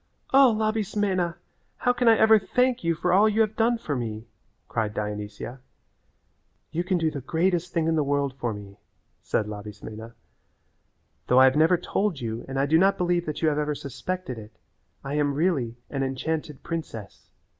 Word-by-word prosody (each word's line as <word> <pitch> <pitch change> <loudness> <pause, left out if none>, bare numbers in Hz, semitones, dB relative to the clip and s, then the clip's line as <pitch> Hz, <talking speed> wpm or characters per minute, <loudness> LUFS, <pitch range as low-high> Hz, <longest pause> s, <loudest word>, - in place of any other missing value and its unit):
"O, 270 -2 +7
Labismena! 205 -5 0 0.4
How 245 - +2
can 245 -1 0
I 225 -1 +7
ever 220 0 +6
thank 250 +3 +1
you 165 0 +1
for 180 +2 0
all 205 +3 +6
you 215 +1 +2
have 215 -1 +1
done 230 +1 +2
for 155 -10 -3
me?" 110 -3 -4 0.4
cried 110 -2 -2
Dionysia. 105 +4 -5 1.1
"You 170 - -1
can 180 0 +1
do 160 -2 +1
the 145 -3 -5
greatest 175 +4 0
thing 165 -2 0
in 165 - +2
the 155 - +2
world 140 -1 0
for 120 -3 -3
me," 100 -1 -9 0.4
said 110 - 0
Labismena; 105 +2 -8 1.1
"though 125 - +5
I - - +8
have 130 +1 +5
never 160 +4 +4
told 195 -3 -1
you 115 -1 -4
and 135 0 -4
I 140 - +3
do 160 +3 +4
not 195 +2 +4
believe 175 -1 0
that 155 +2 -4
you 160 - +5
have 150 0 0
ever 150 0 -1
suspected 140 0 -5
it, 105 0 -13 0.5
I 140 - -4
am 145 -1 +1
really 140 -8 0
an 135 - -2
enchanted 145 +2 -3
princess. 155 -11 -6
155 Hz, 180 wpm, -26 LUFS, 125-185 Hz, 1.1 s, I